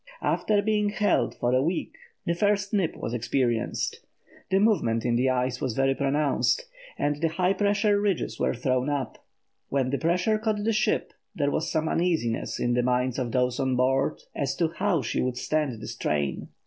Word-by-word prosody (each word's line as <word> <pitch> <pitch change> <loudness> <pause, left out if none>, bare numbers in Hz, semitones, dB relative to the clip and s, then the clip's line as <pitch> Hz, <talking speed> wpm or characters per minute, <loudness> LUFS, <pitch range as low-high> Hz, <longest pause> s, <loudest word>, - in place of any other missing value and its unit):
After 205 -1 +1
being 210 -1 +1
held 205 -1 +1
for 120 +1 0
a 130 - +4
week 165 +5 -2 0.3
the 170 - +1
first 200 +2 +1
nip 195 -5 +1
was 115 - -5
experienced. 120 0 -1 0.5
The 190 - +3
movement 120 - +2
in 120 -1 +2
the 130 +2 +2
ice 125 0 0
was 130 -6 -1
very 135 0 +2
pronounced, 145 - +1 0.3
and 145 +2 -1
high 180 +3 +2
pressure 205 +1 +2
ridges 200 -4 -1
were - - +1
thrown 130 +2 0
up. 140 -5 -3 0.5
When 130 -2 0
the 140 - 0
pressure 180 +6 +1
caught 215 -2 -1
the 225 +1 +1
ship 215 - 0 0.2
there 145 -2 +1
was 160 - -1
some 160 -1 0
uneasiness 160 -10 0
in 120 - +1
the 125 - +2
minds 125 +1 0
of 120 -2 -2
those 125 0 +1
on 130 -1 +1
board 135 +3 +1
as 140 -2 -2
to 165 -3 +1
how 175 -3 0
she 115 - -1
would 125 -1 -1
stand 150 -7 -1
the 110 - -8
strain. 70 -3 -2
145 Hz, 185 wpm, -26 LUFS, 125-190 Hz, 0.5 s, a